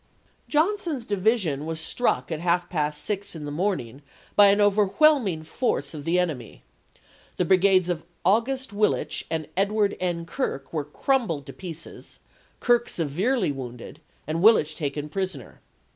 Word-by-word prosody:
Johnson's 320 - 0
division 200 - +1
was 160 -1 -3
struck 205 +4 0
at 160 - -2
half 175 +1 +1
past 150 -3 -1
six 200 -3 -3
in 150 -2 -6
the 145 - -5
morning 145 - -2 0.3
by 205 -1 +8
an 200 +1 +4
overwhelming 205 - +3
force 160 - -1
of 150 -2 -7
the 170 +2 +2
enemy; 155 -11 -3 0.7
the 180 - +1
brigades 185 0 +4
of 175 -3 -2 0.2
August 235 +5 +1
Willich 210 +1 0
and 160 -2 -2
Edward 200 +2 +1
N. 175 -2 -2
Kirk 165 - -4
were 150 -3 -1
crumbled 170 - -1
to - - -9
pieces, 170 -3 -9 0.4
Kirk 240 -1 +2
severely 180 - 0
wounded, 130 +2 -8 0.2
and 160 +2 -2
Willich 185 -8 +5
taken 145 -1 -3
prisoner. 160 - -5
180 Hz, 145 wpm, -25 LUFS, 155-210 Hz, 0.7 s, by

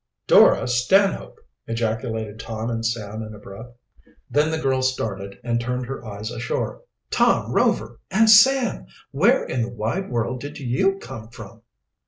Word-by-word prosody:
"Dora - - +6
Stanhope!" 185 +11 +1 0.3
ejaculated 110 -1 -3
Tom 115 0 -4
and 115 -1 -3
Sam 110 -2 -3
in 110 -1 -8
a - - -11
breath. 105 +4 -11 0.6
Then 150 +2 +2
the 160 - -1
girl 135 -4 0
started 100 -7 -3
and 120 -1 -1
turned 125 +1 -3
her 135 -1 -7
eyes 105 0 -6
ashore. 120 - -3 0.3
"Tom - - +2
Rover! - - +1
And 220 +4 +3
Sam! 235 - +5 0.2
Where - - +3
in 125 - -2
the 115 - -2
wide 120 - -3
world 120 +1 -2
did 145 +1 -7
you 150 +10 0
come 130 - -9
from?" 115 -1 -12
120 Hz, 155 wpm, -22 LUFS, 110-135 Hz, 0.6 s, Dora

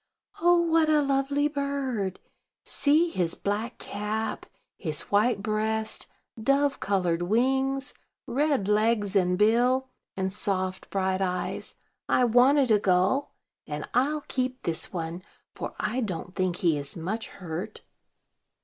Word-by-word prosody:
"Oh, 350 +1 +5
what 325 -2 +3
a 300 -1 +4
lovely 280 +1 +1
bird! 275 -9 -2 0.4
See 315 +4 +2
his 175 - 0
black 215 +4 -3
cap, 210 +2 -4 0.3
his 155 -5 -1
white 205 0 +2
breast, 220 +1 -1 0.3
dove 275 +3 +2
colored 180 -4 0
wings, 265 +7 +1 0.3
red 275 -4 +1
legs 210 -1 +2
and 180 -2 +3
bill, 245 +5 +3 0.3
and 190 0 -1
soft, 185 -2 -2
bright 190 -1 0
eyes. 180 -1 -3 0.3
I 250 - +4
wanted 250 +2 +4
a 210 - +5
gull; 190 +9 +1 0.3
and 150 0 -5
I'll 290 +5 +2
keep 255 -2 -3
this 165 -2 -2
one, 170 0 -4 0.3
for - - -6
I 220 +4 -1
don't 180 -4 -4
think 185 -2 0
he 170 -6 +1
is 140 +2 -2
much 195 +8 -3
hurt." 180 +4 -6
220 Hz, 130 wpm, -27 LUFS, 185-270 Hz, 0.4 s, Oh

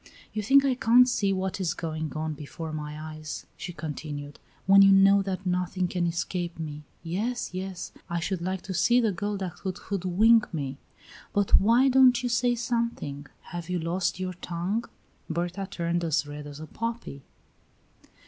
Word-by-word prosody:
"You 215 - -1
think 275 +6 +5
I 270 - +3
can't 250 0 +5
see 205 -5 +1
what 190 0 -2
is 175 -4 0
going 155 -2 -4
on 155 0 -2
before 155 +2 -7
my 150 0 -5
eyes," 155 0 -7
she 175 - -6
continued, 150 -3 -6 0.3
"when 195 +1 +7
you 195 0 +8
know 195 +1 +6
that 190 0 -4
nothing 180 0 0
can 175 -1 -1
escape 170 0 -3
me. 150 -2 -5 0.2
Yes, 205 +7 -2
yes. 185 0 -5 0.2
I 170 - -1
should 180 +1 -2
like 185 +1 -3
to 190 - -5
see 240 +7 +4
the 225 -3 +2
girl 205 +3 -3
that 185 -3 -5
could 190 -1 -4
hoodwink 200 +5 +3
me! 140 -4 -4 0.5
But 205 -1 +4
why 235 +6 +5
don't 255 -1 +5
you 245 - 0
say 240 +1 +2
something? 230 - -2 0.3
Have 175 0 -5
you 180 - 0
lost 175 +2 -1
your 185 0 -3
tongue?" 180 +6 -3 0.4
Berta 175 +4 -2
turned 170 0 -1
as 160 -3 +1
red 145 0 -8
as 145 0 -9
a 155 - -7
poppy. 230 - -5
185 Hz, 175 wpm, -27 LUFS, 160-205 Hz, 0.5 s, you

